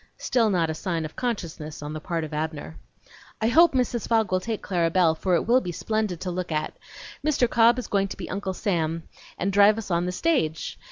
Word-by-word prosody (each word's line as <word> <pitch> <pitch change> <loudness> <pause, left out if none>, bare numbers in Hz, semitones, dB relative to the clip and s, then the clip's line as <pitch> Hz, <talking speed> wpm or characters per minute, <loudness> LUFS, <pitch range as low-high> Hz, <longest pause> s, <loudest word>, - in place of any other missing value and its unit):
(Still 230 -3 +1
not 170 -5 +1
a - - -2
sign 165 0 -3
of 155 - -8
consciousness 165 -11 -4
on 150 +1 -5
the 155 - -4
part 165 +1 -3
of 155 0 -6
Abner.) 150 - -4 0.6
"I 220 - +1
hope 335 +6 +6
Mrs. 245 -3 0
Fogg 225 -4 +2
will 185 - +2
take 220 +3 -4
Clara 170 -3 +1
Belle, 170 -2 +3
for 180 +3 0
it - - 0
will 245 +3 +4
be 180 - -4
splendid 215 -1 -2
to 185 - -3
look 180 -1 -4
at! 155 0 -2 0.5
Mr. 285 -5 +2
Cobb 235 +1 +4
is 250 - -3
going 195 -1 +1
to - - -8
be 185 - -6
Uncle 190 -1 -3
Sam 165 -5 -1 0.3
and 195 +2 -1
drive 205 +2 +6
us 215 -4 -5
on 170 +1 +1
the - - -1
stage. 180 - -1
185 Hz, 225 wpm, -25 LUFS, 165-225 Hz, 0.6 s, hope